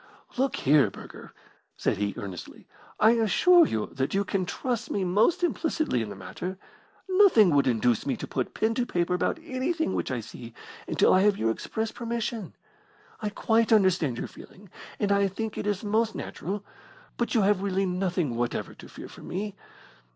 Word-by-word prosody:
"Look 265 +2 0
here, 140 -5 +4
Burger," - - -12 0.5
said - - 0
he, 100 0 -2
earnestly, 95 -4 -8 0.3
"I 220 - +6
assure 280 - +5
you 110 - -1
that 135 +6 -2
you 200 - +2
can 190 -3 -1
trust 240 +1 -3
me 200 - -1
most 210 - +2
implicitly 315 - 0
in 110 - -4
the 100 - -7
matter. 175 - -6 0.5
Nothing 370 - +6
would 140 -1 +3
induce 120 -1 +2
me - - 0
to - - -5
put - - -3
pen 220 +1 +1
to 245 +1 0
paper 175 0 0
about 180 - 0
anything 320 +4 -1
which - - -2
I - - -2
see - - -10 0.3
until - - +3
I 185 - +5
have 205 0 +3
your 115 0 +1
express 220 - -3
permission. 230 -3 -4 0.6
I 210 - -2
quite 225 +2 +1
understand 185 - +3
your - - -3
feeling, 195 -1 -15 0.3
and 205 -1 +1
I 200 0 +3
think 215 +3 -4
it - - -4
is 205 -1 -1
most 220 +2 +1
natural, 205 +2 -5 0.5
but 240 - -2
you 225 - +4
have 200 -1 +3
really 195 -1 0
nothing 180 -7 -1
whatever 120 0 -2
to - - -13
fear - - -10
from - - -12
me. 200 +2 -4
200 Hz, 180 wpm, -27 LUFS, 175-230 Hz, 0.6 s, I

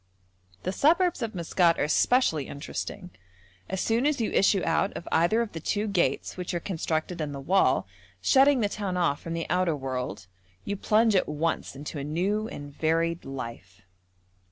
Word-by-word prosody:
The 185 - -1
suburbs 335 - +3
of 225 -3 -3
Maskat 170 0 +2
are - - +1
especially 155 - +2
interesting. 180 +5 -6 0.6
As 190 0 -2
soon 230 +5 +2
as 300 -3 0
you 225 - 0
issue 195 -1 +3
out 165 +4 +1
of 170 - -9
either 175 +8 +3
of 220 - -7
the 165 - -6
two 205 +6 -1
gates 175 -9 0
which 180 -1 -4
are - - 0
constructed 165 -1 -2
in 150 -2 -3
the 140 - -5
wall, 140 -2 +2 0.3
shutting 270 - +5
the 205 - +2
town 200 -3 -3
off 170 -5 +1
from 165 - -5
the 165 0 -2
outer 180 -1 +1
world, 125 -7 -4 0.4
you 200 - -2
plunge 215 +2 +3
at 185 - +2
once 150 -1 -2
into 145 +2 -6
a - - -4
new 190 +9 -1
and 145 -8 -8
varied 165 +1 0
life. 115 -8 -8
170 Hz, 180 wpm, -27 LUFS, 150-205 Hz, 0.6 s, shutting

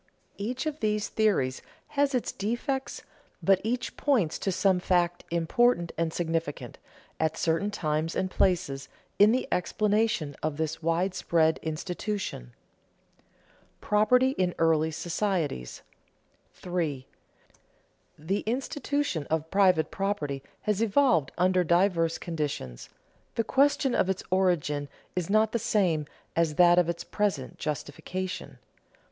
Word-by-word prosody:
Each 245 +8 -3
of 310 -1 -3
these 210 -1 0
theories 190 -13 +1 0.3
has 285 -1 +1
its 245 - -1
defects, 240 +6 -3 0.4
but 195 -1 +4
each 240 +3 -2
points 230 - +1
to 195 - -1
some 185 0 +2
fact 175 -1 +1
important 170 +2 +2
and 165 0 -1
significant, 160 -7 -3 0.4
at 160 0 0
certain 165 +5 +1
times 155 -4 -1
and 185 0 -1
places, 145 -9 0 0.3
in 205 +2 +7
the 255 +2 0
explanation 205 -5 +1
of 155 -1 -2
this 160 0 -2
widespread 165 -1 +1
institution. 175 - -4
[Sidenote: - - -36
Property 250 +5 +4
in 180 -1 +1
early 160 -1 +3
societies] 165 - -2 0.7
3. 160 -7 -3 1.1
_The 185 +7 -2
institution 270 - -1
of 160 0 -2
private 185 -5 +3
property 155 -9 -2 0.2
has 210 0 0
evolved 210 - +3
under 185 +1 +3
diverse 170 -1 +2
conditions; 145 - -4 0.5
the 230 - +1
question 270 +1 +2
of 185 - +2
its 190 - -1
origin 160 -6 +1 0.3
is 180 -1 -2
not 215 +1 +3
the 235 - 0
same 185 -10 +1 0.3
as 165 -2 +1
that 175 +1 +6
of 175 -1 +2
its 170 0 -3
present 195 -11 -2
justification. 165 +5 -5
180 Hz, 120 wpm, -28 LUFS, 160-210 Hz, 1.1 s, in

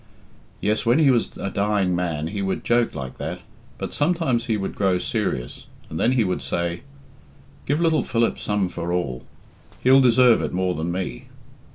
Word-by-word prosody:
Yes, 105 +1 +1
when 120 +2 +3
he 150 -4 +5
was 120 -3 0
a 95 - -4
dying 100 -3 +1
man 85 -4 -2
he 100 +1 -4
would 95 -1 -2
joke 120 0 +1
like 65 -2 -6
that. - - -4 0.4
But - - -5
sometimes 145 -7 0
he 110 -3 +1
would 95 - -3
grow 95 -2 +1
serious, 60 -7 -3 0.2
and 80 - -4
then 125 - +3
he 125 -3 +3
would 90 -2 -1
say, 85 +2 -2 0.9
'Give 145 +3 +1
little 165 -2 +3
Philip 115 -1 0
some 105 -2 0
for 85 -1 -4
all. 70 -9 -2 0.6
He'll 130 +2 +6
deserve 125 -1 +5
it - - -3
more 90 0 0
than 85 +1 -3
me. 90 -9 -4
100 Hz, 180 wpm, -23 LUFS, 90-120 Hz, 0.9 s, He'll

